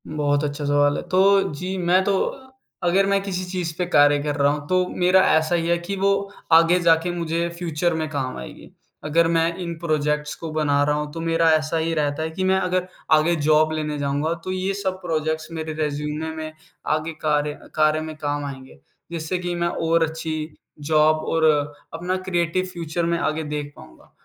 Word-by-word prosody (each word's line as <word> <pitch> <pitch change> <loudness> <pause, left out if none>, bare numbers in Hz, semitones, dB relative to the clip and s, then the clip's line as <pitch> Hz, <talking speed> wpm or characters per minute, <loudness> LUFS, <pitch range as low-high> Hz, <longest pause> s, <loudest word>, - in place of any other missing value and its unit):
बहुत 145 -1 0
अच्छा 145 0 -3
सवाल 145 0 +3
है। - - -3
तो 195 +2 +5
जी, 185 +6 -4
मैं 180 +1 +3
तो 195 0 +1 0.7
अगर 185 +3 +3
मैं 200 0 +2
किसी 185 -2 -3
चीज़ 180 -2 -3
पे 180 - 0
कार्य 145 -4 +5
कर 150 -1 -1
रहा 140 0 +3
हूँ, 145 0 -4
तो 185 +1 +2
मेरा 180 +1 +3 0.2
ऐसा 160 +2 +1
ही 165 -1 0
है 170 0 +2
कि 180 +3 -4
वो 195 +1 +2 0.4
आगे 165 +2 +6
जा 170 -2 +5
के 175 - -1
मुझे 170 -1 -1
फ्यूचर 170 0 -1
में 160 -1 -2
काम 135 -4 -3
आएगी। 65 - -10 0.3
अगर 165 +2 +2
मैं 165 0 +2
इन 170 -2 -4
प्रोजेक्ट्स 150 -2 -1
को 165 - -7
बना 150 -2 +1
रहा 145 0 +1
हूँ, 150 0 -3
तो 165 - -7
मेरा 165 0 +2
ऐसा 155 +1 +1
ही 165 +1 0
रहता 150 0 -1
है 160 - -2
कि 185 +4 -3
मैं 190 0 +3
अगर 180 0 -1 0.2
आगे 155 +2 +4
जॉब 155 0 +3
लेने 150 -1 -2
जाऊँगा, 145 +3 0
तो 170 +2 -6
ये 185 +1 -1
सब 190 -2 -3
प्रोजेक्ट्स 155 -2 -2
मेरे 160 -1 -4
रिज़्यूमे 150 +1 -3
में 155 0 -5 0.4
आगे 155 +1 -4
कार्य 150 -1 +1 0.2
कार्य 155 0 +3
में 155 0 -6
काम 145 -1 -2
आएँगे, 130 -2 -9 0.3
जिससे 165 +1 -2
कि 175 -1 -3
मैं 170 0 0
और 165 -1 +1
अच्छी 160 -1 -5 0.3
जॉब 155 +1 +3
और 165 -1 +1 0.5
अपना 175 +3 -2
क्रिएटिव 175 0 0
फ्यूचर 170 -1 -3
मैं 170 0 0
आगे 155 0 -1
देख 150 -1 -5
पाऊँगा। 65 - -16
160 Hz, 200 wpm, -23 LUFS, 150-175 Hz, 0.7 s, आगे